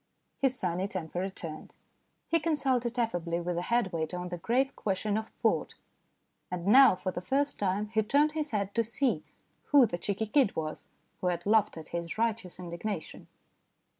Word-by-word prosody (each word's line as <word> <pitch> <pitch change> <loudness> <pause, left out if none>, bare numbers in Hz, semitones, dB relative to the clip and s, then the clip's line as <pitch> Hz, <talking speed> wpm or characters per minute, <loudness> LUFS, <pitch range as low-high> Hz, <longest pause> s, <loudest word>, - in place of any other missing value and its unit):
His 265 -2 +2
sunny 180 0 -1
temper 175 -3 -4
returned. 175 -4 -6 0.5
He 330 - +3
consulted 265 -6 0
affably 175 -8 0
with 175 0 -2
the 175 - -1
head 230 -1 0
waiter 160 +1 -2
on 180 0 -4
the 175 -1 -5
grave 255 +8 +1
question 205 +1 -1
of 220 0 -2
port. - - +1 0.7
And 180 -1 -4
now, 255 +1 +8
for 185 0 -3
the 175 - -5
first 280 +8 0
time, 205 +2 0
he 220 0 +2
turned 285 +8 +3
his 305 -1 -2
head 200 -2 -2
to 230 - +2
see 250 +4 0 0.4
who 285 -4 +6
the 175 -6 -4
cheeky 205 +4 -1
kid 250 0 +3
was 155 -1 -4 0.3
who 180 - -1
had 175 -1 -1
laughed 210 -3 +3
at 160 - -9
his 170 +1 -4
righteous 220 -6 -1
indignation. 175 +1 -5
205 Hz, 175 wpm, -30 LUFS, 175-240 Hz, 0.7 s, now